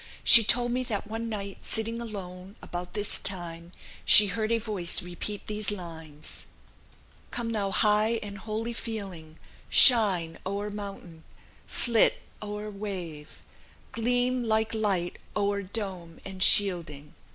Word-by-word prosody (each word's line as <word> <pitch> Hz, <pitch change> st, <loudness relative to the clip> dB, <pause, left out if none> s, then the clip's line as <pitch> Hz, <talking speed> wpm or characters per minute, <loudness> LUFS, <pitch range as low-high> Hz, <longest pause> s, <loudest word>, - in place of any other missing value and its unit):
"She 230 Hz, -, +9 dB
told 240 Hz, +2 st, +4 dB
me 250 Hz, +1 st, -1 dB
that 210 Hz, -4 st, -3 dB
one 225 Hz, +2 st, -5 dB
night, 200 Hz, -2 st, -6 dB
sitting 230 Hz, +1 st, -2 dB
alone, 190 Hz, -3 st, -8 dB
about 180 Hz, 0 st, -7 dB
this 205 Hz, -1 st, +1 dB
time, 170 Hz, -3 st, -1 dB, 0.3 s
she 210 Hz, -, +8 dB
heard 215 Hz, +3 st, -3 dB
a 230 Hz, -, +3 dB
voice 210 Hz, -8 st, -2 dB
repeat 180 Hz, +4 st, -6 dB
these 210 Hz, -1 st, -3 dB
lines: 160 Hz, -6 st, -8 dB, 0.8 s
"'Come 235 Hz, -1 st, -3 dB
thou 205 Hz, -3 st, -1 dB
high 215 Hz, +3 st, +3 dB
and 200 Hz, -1 st, -8 dB
holy 225 Hz, +3 st, -4 dB
feeling, 190 Hz, -9 st, -7 dB, 0.3 s
Shine 195 Hz, -10 st, +5 dB
o'er 200 Hz, +2 st, -4 dB
mountain, 195 Hz, -5 st, -9 dB, 0.4 s
flit 235 Hz, -3 st, +2 dB, 0.3 s
o'er 210 Hz, 0 st, -6 dB
wave, 185 Hz, -7 st, -8 dB, 0.5 s
Gleam 245 Hz, +2 st, 0 dB
like 220 Hz, -1 st, 0 dB
light 195 Hz, -5 st, -1 dB, 0.2 s
o'er 200 Hz, -1 st, 0 dB
dome 185 Hz, -4 st, -7 dB
and 190 Hz, -1 st, -8 dB
shielding.' 165 Hz, -8 st, +3 dB
205 Hz, 130 wpm, -27 LUFS, 180-220 Hz, 0.8 s, She